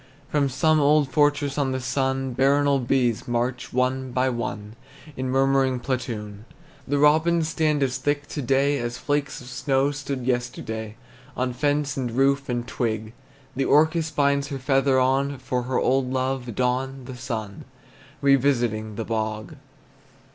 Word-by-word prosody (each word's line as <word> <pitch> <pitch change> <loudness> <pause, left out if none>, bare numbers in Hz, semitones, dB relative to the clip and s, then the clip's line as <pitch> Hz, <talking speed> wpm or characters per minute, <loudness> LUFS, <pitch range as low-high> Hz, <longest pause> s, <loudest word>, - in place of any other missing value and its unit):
From 145 -2 +1
some 155 +4 +2
old 145 -1 +3
fortress 145 -1 +2
on 135 -2 0
the 130 - -2
sun 130 0 -1
Baronial 140 +2 +3
bees 125 -2 0
march, 120 +1 -2
one 130 +1 0
by 130 +1 +1
one, 110 -3 -4 0.4
In 130 0 -3
murmuring 135 -1 +2
platoon! 110 -5 -4 0.4
The 145 +1 +1
robins 160 +3 +3
stand 155 -3 +1
as 130 -1 -1
thick 145 +2 -1
to 150 - -4
day 135 +2 +2
As 120 0 -3
flakes 145 -2 -2
of 125 - -12
snow 135 +2 0
stood 140 -3 -5
yesterday, 120 -3 -3 0.4
On 125 0 -1
fence 145 +1 0
and 130 -2 -1
roof 135 +2 +2
and 120 -1 -2
twig. 110 -2 -3 0.4
The 135 +1 0
orchis 160 +2 +3
binds 140 -2 +1
her 140 - -4
feather 135 0 +2
on 135 +2 +1
For 125 0 -2
her 125 +1 -2
old 130 0 +1
lover, 130 -1 -1
Don 130 +2 -1
the 130 0 -8
Sun, 110 -5 -5 0.6
Revisiting 120 -6 +2
the 115 - -4
bog! 110 +4 -3
130 Hz, 150 wpm, -24 LUFS, 125-140 Hz, 0.6 s, old